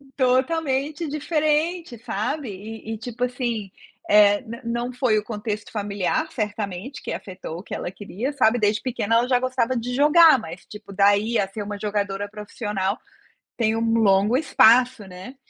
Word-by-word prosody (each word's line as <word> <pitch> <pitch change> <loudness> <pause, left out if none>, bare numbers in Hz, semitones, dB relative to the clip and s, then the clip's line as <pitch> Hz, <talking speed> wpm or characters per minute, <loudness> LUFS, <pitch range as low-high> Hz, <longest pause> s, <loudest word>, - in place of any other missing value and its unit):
Totalmente 280 +3 0
diferente 305 0 -1
sabe, 245 +6 -3
e 220 +3 -7
e - - -5
tipo 245 +1 -5
assim, 240 -6 -2 0.4
eh, 205 0 +5
na 235 0 -9
não 235 +2 -3
foi 245 -4 +2
o 210 - -1
contexto 210 -1 -5
familiar 205 - -2
certamente 210 - -4
que - - -5
afetou 185 -4 -7
o - - -10
que - - -9
ela - - -3
queria 205 +7 -5
sabe, 245 -3 +3
desde 210 0 +2
pequena 230 -3 -1
ela 240 +2 +3
já 250 -1 +3
gostava 255 -1 0
de 245 +1 -3
jogar, 305 +1 +7
mas 175 -4 -9
tipo 210 -1 -11
daí 205 +4 +3
a 195 - +1
ser 205 +2 -6
uma 205 0 -6
jogadora 205 -1 -2
profissional 210 -1 -3 0.6
tem 225 -2 +1
um 225 0 0
longo 205 +3 +4
espaço, 255 -4 +4
né, 185 +8 -10
225 Hz, 165 wpm, -23 LUFS, 205-255 Hz, 0.6 s, jogar